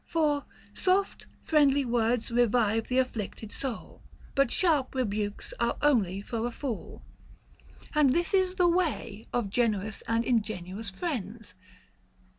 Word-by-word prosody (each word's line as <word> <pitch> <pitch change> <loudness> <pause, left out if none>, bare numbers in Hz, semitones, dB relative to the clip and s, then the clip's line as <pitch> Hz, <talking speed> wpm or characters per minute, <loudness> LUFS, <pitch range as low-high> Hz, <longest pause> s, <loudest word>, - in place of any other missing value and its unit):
For 300 -3 +1 0.3
Soft, 380 +2 0 0.2
friendly 285 -3 +3
words 235 -1 0
revive 225 -2 +2
th' - - -4
afflicted 225 -4 -2
soul; 260 -5 -5 0.3
But 275 -2 +3
sharp 300 -7 +1
rebukes 210 - -2
are - - +1
only 205 -10 +2
for 230 +2 -2
a - - -4
fool. 240 -3 -6 0.9
And 300 -2 +5
this 345 +8 +1
is 375 -1 +2
the 360 -2 +4
way 335 - -1
of 235 -5 -1
generous 215 -3 0
and 230 +1 +1
ingenuous 210 -3 -1
friends. 230 - -5
240 Hz, 125 wpm, -29 LUFS, 220-290 Hz, 0.9 s, And